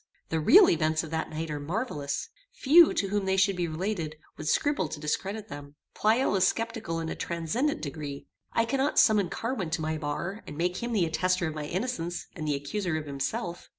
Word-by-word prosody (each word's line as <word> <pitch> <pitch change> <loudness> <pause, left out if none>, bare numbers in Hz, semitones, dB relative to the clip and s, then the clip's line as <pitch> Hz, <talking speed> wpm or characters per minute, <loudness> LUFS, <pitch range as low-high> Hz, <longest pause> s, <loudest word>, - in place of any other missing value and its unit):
The 160 - 0
real 370 - +8
events 155 -1 +2
of 160 - -8
that 160 0 -2
night 160 0 -4
are 150 - -3
marvellous. 155 - -3 0.2
Few, 335 - +6
to 195 - -1
whom 205 0 0
they 190 0 +1
should 195 0 +3
be 175 -1 -1
related, 165 -1 -3 0.2
would 155 - -7
scruple 285 - +1
to 150 - -6
discredit 195 +8 -3
them. 145 0 -9 0.2
Pleyel 220 +1 +2
is 190 -1 +4
sceptical 225 -7 -2
in 165 - -3
a - - -2
transcendant 230 - -1
degree. 140 -1 -5 0.3
I 230 - +2
cannot 270 +5 0
summon 205 -5 +5
Carwin 215 -2 -3
to 160 0 -2
my 155 0 -1
bar, 170 +8 -3
and 145 - -8
make 180 +2 0
him 240 +3 -3
the 200 -6 +2
attestor 180 +2 +1
of - - -6
my 150 -1 -5
innocence, 175 -1 -3
and 155 -3 -4
the 145 - +1
accuser 155 +5 -2
of 155 - -5
himself. 170 - -4
175 Hz, 205 wpm, -28 LUFS, 155-215 Hz, 0.3 s, real